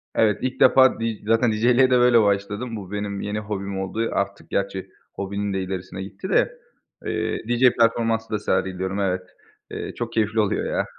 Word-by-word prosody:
Evet. 105 -3 +3
İlk 130 0 -3
defa, 130 -3 +6
d 115 - -1 0.2
zaten 115 +1 +3
DJ´liğe 120 +4 +4
de 125 - +5
böyle 120 -2 +6
başladım. 105 +4 -1
Bu 100 -2 -8
benim 100 -1 -3
yeni 105 +1 -3
hobim 100 -2 -4
oldu. 110 +4 -2
Artık, 100 0 -3
gerçi 100 -1 -2 0.2
hobinin 100 +1 -3
de 95 - -1
ilerisine 95 0 -5
gitti 100 - -8
de. - - +1 0.5
Eee, - - -2
DJ 120 +1 +4
performansı 115 -1 +2
da 105 - -1
sergiliyorum, 95 -1 -1
evet. 90 -2 0 0.5
Eee, - - -5
çok 120 -1 -4
keyifli 110 0 +1
oluyor 105 - +1
ya. - - -1
105 Hz, 175 wpm, -23 LUFS, 100-115 Hz, 0.5 s, defa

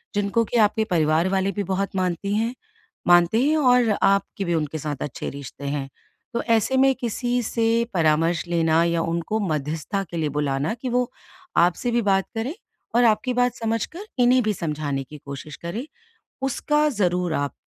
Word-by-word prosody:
जिनको 205 +3 +1
कि 240 - -1
आपके 220 0 +3
परिवार 160 -3 +2
वाले 190 0 +1
भी 200 +2 -2
बहुत 195 +1 -2
मानती 185 +2 -1
हैं 230 +3 0 0.5
मानते 175 +6 +5
हैं 310 +3 +3
और 250 -4 +4
आपकी 200 0 +1
भी 175 - 0
उनके 155 -1 -2
साथ 150 -1 -3
अच्छे 145 - -5
रिश्ते 140 0 -9
हैं। 140 -1 -3 0.4
तो 235 - 0
ऐसे 230 +3 +2
में 270 0 +5
किसी 245 +1 -1
से 230 +1 -1 0.3
परामर्श 165 0 +2
लेना 165 -1 +2
या 170 -1 +1
उनको 170 +6 -1
मध्यस्थता 155 +6 -2
के 170 - -4
लिए 155 -2 0
बुलाना 145 +3 -1
कि 255 - -2
वो 245 0 0 0.5
आपसे 180 +8 +3
भी 235 0 +2
बात 195 -2 +2
करें 230 +7 -2 0.4
और 245 - +5
आपकी 235 +3 +2
बात 245 0 +2
समझकर, 230 - -3
इन्हें 250 +1 +5
भी 215 -1 +1
समझाने 150 -5 -3
की 150 +3 -11
कोशिश 140 +1 -7
करें। 210 - -5 0.6
उसका 295 +3 +1
ज़रूर 180 - 0
आप 145 0 -1
195 Hz, 175 wpm, -23 LUFS, 160-235 Hz, 0.6 s, मानते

